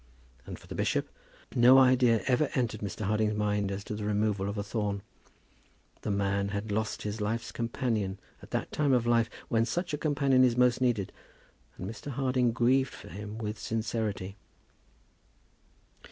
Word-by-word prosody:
And -, -, -6 dB
for -, -, -17 dB
the -, -, -8 dB
bishop, -, -, 0 dB, 0.5 s
no 125 Hz, +2 st, +7 dB
idea 125 Hz, -3 st, +5 dB
ever 130 Hz, +4 st, +2 dB
entered 120 Hz, -5 st, -1 dB
Mr. 100 Hz, 0 st, -5 dB
Harding's 105 Hz, +1 st, +1 dB
mind 105 Hz, -1 st, 0 dB
as 100 Hz, 0 st, -4 dB
to -, -, -6 dB
the 105 Hz, 0 st, -4 dB
removal 105 Hz, -1 st, 0 dB
of 100 Hz, -, -4 dB
a 100 Hz, -, -1 dB
thorn. 105 Hz, -2 st, -2 dB, 1.0 s
The -, -, -4 dB
man 100 Hz, 0 st, 0 dB
had 100 Hz, +1 st, -4 dB
lost 110 Hz, +1 st, -2 dB
his 105 Hz, +1 st, -4 dB
life's 115 Hz, +2 st, -2 dB
companion 115 Hz, -5 st, -2 dB, 0.2 s
at -, -, -13 dB
that -, -, -3 dB
time 145 Hz, -3 st, +2 dB
of 120 Hz, -2 st, +2 dB
life 115 Hz, -1 st, +3 dB, 0.2 s
when 115 Hz, -1 st, +2 dB
such 175 Hz, +8 st, -2 dB
a 150 Hz, -, -1 dB
companion 140 Hz, -4 st, +3 dB
is 125 Hz, -2 st, +3 dB
most 125 Hz, 0 st, +3 dB
needed; 115 Hz, -7 st, +1 dB, 0.6 s
and 90 Hz, -, -5 dB
Mr. 115 Hz, +7 st, -7 dB
Harding 130 Hz, -2 st, +1 dB
grieved 130 Hz, +3 st, +2 dB
for 100 Hz, +1 st, -11 dB
him 105 Hz, +2 st, -7 dB
with 105 Hz, -1 st, -4 dB
sincerity. 110 Hz, -3 st, -3 dB
110 Hz, 170 wpm, -29 LUFS, 105-125 Hz, 1.0 s, no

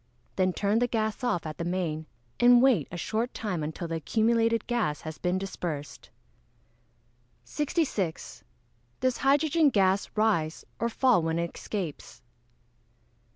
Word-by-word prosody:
Then 185 Hz, -1 st, +2 dB
turn 205 Hz, +4 st, +1 dB
the 245 Hz, -, +2 dB
gas 220 Hz, +1 st, -2 dB
off 220 Hz, -10 st, 0 dB
at 155 Hz, -1 st, -6 dB
the -, -, -1 dB
main, 170 Hz, -3 st, -2 dB, 0.3 s
and 245 Hz, 0 st, +7 dB
wait 240 Hz, -, +4 dB
a 175 Hz, -, -5 dB
short 225 Hz, +7 st, -2 dB
time 195 Hz, -7 st, -3 dB
until 160 Hz, +3 st, -4 dB
the 165 Hz, 0 st, -2 dB
accumulated 230 Hz, +5 st, +1 dB
gas 220 Hz, -, -1 dB
has 155 Hz, 0 st, -7 dB
been 180 Hz, +1 st, 0 dB
dispersed. 155 Hz, -10 st, -5 dB, 1.3 s
66. 260 Hz, -, -2 dB, 0.6 s
_Does 255 Hz, -1 st, 0 dB
hydrogen 290 Hz, +3 st, +3 dB
gas 195 Hz, -4 st, +2 dB
rise 185 Hz, -8 st, +1 dB
or 235 Hz, -, 0 dB
fall 245 Hz, -4 st, +3 dB
when 165 Hz, 0 st, -1 dB
it 170 Hz, 0 st, -3 dB
escapes? 185 Hz, -8 st, -6 dB
200 Hz, 135 wpm, -28 LUFS, 165-240 Hz, 1.3 s, and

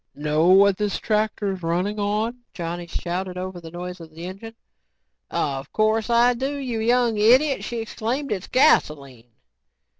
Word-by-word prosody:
"Know 150 Hz, +3 st, +1 dB
what 195 Hz, +1 st, +6 dB
this 210 Hz, -1 st, -1 dB
tractor's 210 Hz, -3 st, -1 dB
running 180 Hz, +5 st, -1 dB
on?" 215 Hz, +4 st, -1 dB, 0.2 s
Johnny 170 Hz, 0 st, -5 dB
shouted 180 Hz, +2 st, -4 dB
over 185 Hz, -1 st, -6 dB
the 165 Hz, -, -9 dB
noise 180 Hz, +2 st, -7 dB
of 165 Hz, -1 st, -11 dB
the 165 Hz, +2 st, -9 dB
engine. 200 Hz, +5 st, -8 dB, 0.7 s
"Of 135 Hz, -2 st, -3 dB
course 215 Hz, +1 st, +1 dB
I 240 Hz, +1 st, +4 dB
do, 265 Hz, +4 st, -3 dB
you 250 Hz, -5 st, -3 dB
young 235 Hz, 0 st, +2 dB
idiot," 260 Hz, +6 st, +4 dB
she 240 Hz, -, -4 dB
exclaimed. 235 Hz, +5 st, -3 dB
"It's 195 Hz, -2 st, -3 dB
gasoline." 140 Hz, -, +2 dB
205 Hz, 150 wpm, -23 LUFS, 175-230 Hz, 0.7 s, what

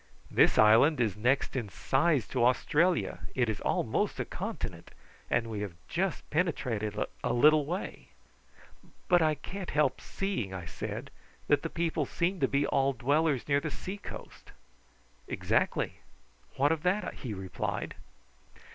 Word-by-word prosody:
This -, -, +4 dB
island 115 Hz, +8 st, +6 dB
is 110 Hz, -6 st, +1 dB
next 125 Hz, +7 st, +1 dB
in 120 Hz, -6 st, -2 dB
size 140 Hz, -, +1 dB
to 125 Hz, -3 st, +1 dB
Australia. 155 Hz, +8 st, +2 dB, 0.2 s
It 125 Hz, -3 st, +2 dB
is 110 Hz, -, -3 dB
almost -, -, 0 dB
a -, -, -1 dB
continent, -, -, -5 dB, 0.4 s
and 115 Hz, 0 st, +2 dB
we 110 Hz, -2 st, -4 dB
have 100 Hz, -5 st, -5 dB
just 185 Hz, 0 st, -2 dB
penetrated 120 Hz, -, -1 dB, 0.3 s
a -, -, +1 dB
little 150 Hz, +3 st, +5 dB
way." 180 Hz, +4 st, -4 dB, 1.0 s
"But 175 Hz, -2 st, +5 dB
I 155 Hz, -1 st, +3 dB
can't 185 Hz, +6 st, -7 dB
help 150 Hz, -3 st, +1 dB
seeing," 120 Hz, -, -3 dB
I 90 Hz, -2 st, -6 dB
said, -, -, -6 dB, 0.4 s
"that 145 Hz, -1 st, +4 dB
the 165 Hz, -, -3 dB
people 165 Hz, -4 st, -1 dB
seem 180 Hz, +2 st, -1 dB
to 135 Hz, -, +3 dB
be 140 Hz, +2 st, +1 dB
all 135 Hz, 0 st, +2 dB
dwellers 140 Hz, +2 st, +1 dB
near 140 Hz, -1 st, +3 dB
the 155 Hz, -, -3 dB
sea 190 Hz, +6 st, -6 dB
coast." 200 Hz, -, -10 dB, 0.8 s
"Exactly. -, -, 0 dB, 0.6 s
What 145 Hz, +3 st, +3 dB
of 160 Hz, -2 st, 0 dB
that?" 185 Hz, +5 st, 0 dB
he 115 Hz, -5 st, -6 dB
replied. 95 Hz, -1 st, -4 dB
140 Hz, 145 wpm, -30 LUFS, 120-165 Hz, 1.0 s, island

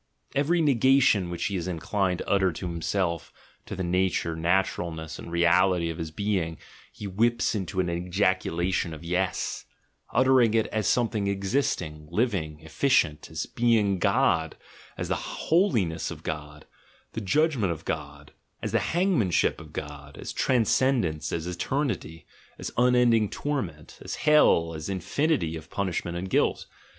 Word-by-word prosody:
Every 160 Hz, +5 st, +2 dB
negation 130 Hz, -, +4 dB
which 85 Hz, -1 st, -3 dB
he 100 Hz, -, -1 dB
is 90 Hz, -1 st, -3 dB
inclined 90 Hz, +2 st, -1 dB
to -, -, -7 dB
utter 95 Hz, -2 st, +3 dB
to 85 Hz, -, -7 dB
himself, 85 Hz, 0 st, -2 dB, 0.4 s
to -, -, -5 dB
the 95 Hz, -, -3 dB
88 -, -, -2 dB
THE 95 Hz, +1 st, +3 dB
GENEALOGY -, -, -1 dB
OF -, -, -6 dB
MORALS 80 Hz, -1 st, -3 dB
nature, 90 Hz, +2 st, +5 dB
naturalness, 80 Hz, -4 st, -4 dB
and 85 Hz, -, -9 dB
reality 85 Hz, 0 st, +3 dB
of 80 Hz, -, -8 dB
his 80 Hz, -1 st, -4 dB
being, 85 Hz, -2 st, -2 dB, 0.3 s
he 105 Hz, -, -9 dB
whips 115 Hz, +5 st, +1 dB
into 95 Hz, -2 st, -3 dB
an 90 Hz, -, +1 dB
ejaculation 90 Hz, -1 st, 0 dB
of 75 Hz, -, -12 dB
"yes," 90 Hz, +2 st, -2 dB, 0.5 s
uttering 125 Hz, -3 st, +4 dB
it 110 Hz, -, +3 dB
as 110 Hz, -3 st, 0 dB
something 110 Hz, -4 st, +1 dB
ex 100 Hz, +1 st, -3 dB
isting, 75 Hz, -, -1 dB
living, 85 Hz, -7 st, -1 dB
efficient, 80 Hz, -, +1 dB
as 80 Hz, 0 st, -3 dB
being 110 Hz, -5 st, +2 dB
God, 80 Hz, -1 st, +2 dB, 0.4 s
as -, -, -3 dB
the -, -, 0 dB
holiness 120 Hz, -, 0 dB
of -, -, -8 dB
God, 75 Hz, -1 st, -6 dB, 0.5 s
the 110 Hz, -, -5 dB
judgment 130 Hz, -, +1 dB
of 80 Hz, -1 st, -6 dB
God, 75 Hz, -2 st, -5 dB, 0.3 s
as -, -, -2 dB
the -, -, +2 dB
hangmanship 170 Hz, -, +1 dB
of -, -, -12 dB
God, 75 Hz, -1 st, -8 dB
as -, -, -6 dB
transcendence, 115 Hz, -, +1 dB
as 80 Hz, -1 st, -2 dB
eternity, 90 Hz, -, -3 dB, 0.3 s
as -, -, -5 dB
unending 120 Hz, -3 st, +4 dB
torment, 95 Hz, -, -4 dB
as -, -, -5 dB
hell, 115 Hz, -, +5 dB
as 80 Hz, +1 st, -6 dB
infinity 95 Hz, -, 0 dB
of 80 Hz, -1 st, -9 dB
punishment 85 Hz, -3 st, -2 dB
and 90 Hz, +2 st, -4 dB
guilt. -, -, +1 dB
95 Hz, 160 wpm, -26 LUFS, 80-115 Hz, 0.5 s, nature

